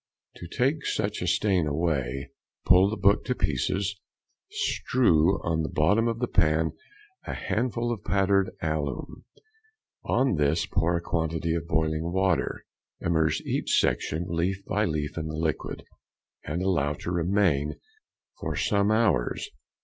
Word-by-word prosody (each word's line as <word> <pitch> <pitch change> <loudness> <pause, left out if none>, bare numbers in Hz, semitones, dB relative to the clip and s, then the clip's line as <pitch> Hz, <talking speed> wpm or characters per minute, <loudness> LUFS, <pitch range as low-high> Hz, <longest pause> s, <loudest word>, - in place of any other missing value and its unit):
To 85 - -8
take 140 - 0
such 105 0 -1
a 90 - -2
stain 95 -4 +2
away, 70 -4 -1 0.3
pull 95 +2 +6
the 110 - -3
book 100 +1 +3
to 125 - -1
pieces, 95 - -1 0.5
strew 95 -7 +2
on 80 -1 0
the 80 - -2
bottom 105 +10 +2
of 115 -1 -1
the 125 +1 -1
pan 80 -4 +2 0.6
a - - -3
handful 120 +1 -1
of 105 - -8
powdered 100 -1 +2
alum, 75 -4 -3 0.8
on 130 -9 +1
this 75 +3 +2
pour 85 -2 +1
a - - -4
quantity 80 -1 -1
of 85 -1 -3
boiling 80 +1 0
water. 95 -4 0 0.3
Immerse 80 -2 +1
each - - +1
section 80 +3 0
leaf 95 +3 -1
by 105 +1 0
leaf 75 -1 -2
in 80 - -4
the 80 - -5
liquid, 80 -1 -2 0.6
and 85 +5 -3
allow 75 -7 +1
to 85 - -6
remain 85 -5 +1 0.6
for - - -3
some 100 0 +1
hours. 110 - +1
85 Hz, 140 wpm, -27 LUFS, 80-100 Hz, 0.8 s, pull